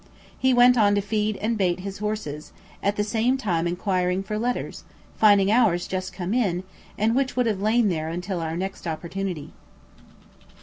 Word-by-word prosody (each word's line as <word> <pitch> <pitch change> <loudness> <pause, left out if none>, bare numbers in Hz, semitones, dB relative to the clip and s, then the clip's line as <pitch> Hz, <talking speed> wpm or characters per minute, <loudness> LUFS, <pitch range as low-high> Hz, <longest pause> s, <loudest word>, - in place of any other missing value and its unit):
He 260 - +2
went 245 0 +6
on 205 -1 +4
to - - +2
feed 210 +1 -1
and 220 +1 -1
bait 180 -1 +1
his 195 0 -6
horses, 210 -9 -4 0.3
at 200 +1 0
the 210 - 0
same 230 +5 +1
time 175 -9 -1
enquiring 180 +1 0
for 210 +2 -3
letters, 245 +2 -3 0.3
finding 205 -2 +5
ours 215 -7 +3
just 185 0 -3
come 185 +2 -4
in, 190 -8 0 0.3
and 220 +3 +2
which 270 -1 0
would 250 -1 +2
have 210 -4 -1
lain 215 +1 +3
there 160 -3 -2
until 180 +2 -3
our 165 0 -3
next 190 0 -5
opportunity. 170 0 -4
200 Hz, 175 wpm, -24 LUFS, 180-220 Hz, 0.3 s, went